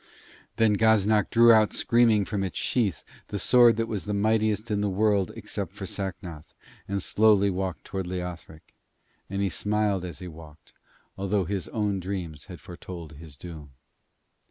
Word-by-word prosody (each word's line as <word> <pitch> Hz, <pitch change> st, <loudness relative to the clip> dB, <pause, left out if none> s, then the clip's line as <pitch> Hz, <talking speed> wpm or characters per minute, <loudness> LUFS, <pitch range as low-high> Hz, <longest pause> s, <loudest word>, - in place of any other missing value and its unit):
Then 110 Hz, -2 st, +3 dB
Gaznak 110 Hz, -2 st, +3 dB
drew 115 Hz, 0 st, +6 dB
out 110 Hz, -1 st, +4 dB
screaming 115 Hz, -4 st, +3 dB
from 100 Hz, -1 st, -2 dB
its 95 Hz, -, -4 dB
sheath 100 Hz, -, 0 dB, 0.2 s
the 105 Hz, -, -4 dB
sword 120 Hz, +1 st, +5 dB
that 115 Hz, -, 0 dB
was 110 Hz, -4 st, -4 dB
the 105 Hz, 0 st, -2 dB
mightiest 110 Hz, +1 st, +1 dB
in 105 Hz, -1 st, 0 dB
the 105 Hz, -, 0 dB
world 100 Hz, -1 st, +1 dB
except -, -, -5 dB
for -, -, -7 dB
Sacnoth, 90 Hz, -5 st, -6 dB, 0.3 s
and 100 Hz, -1 st, -2 dB
slowly 105 Hz, -2 st, +3 dB
walked 90 Hz, -4 st, -3 dB
towards 95 Hz, -2 st, -5 dB
Leothric; 90 Hz, -3 st, -7 dB, 0.6 s
and 100 Hz, +1 st, -2 dB
he 100 Hz, -, +1 dB
smiled 105 Hz, +1 st, 0 dB
as 85 Hz, -4 st, -6 dB
he 90 Hz, -, -8 dB
walked, 80 Hz, -2 st, -14 dB, 0.5 s
although 100 Hz, -1 st, 0 dB
his 95 Hz, +1 st, -3 dB
own 105 Hz, -3 st, -1 dB
dreams 90 Hz, -5 st, -5 dB
had 90 Hz, -3 st, -10 dB
foretold 85 Hz, -1 st, -9 dB
his 80 Hz, -4 st, -11 dB
doom. 75 Hz, -5 st, -10 dB
100 Hz, 160 wpm, -26 LUFS, 90-105 Hz, 0.6 s, drew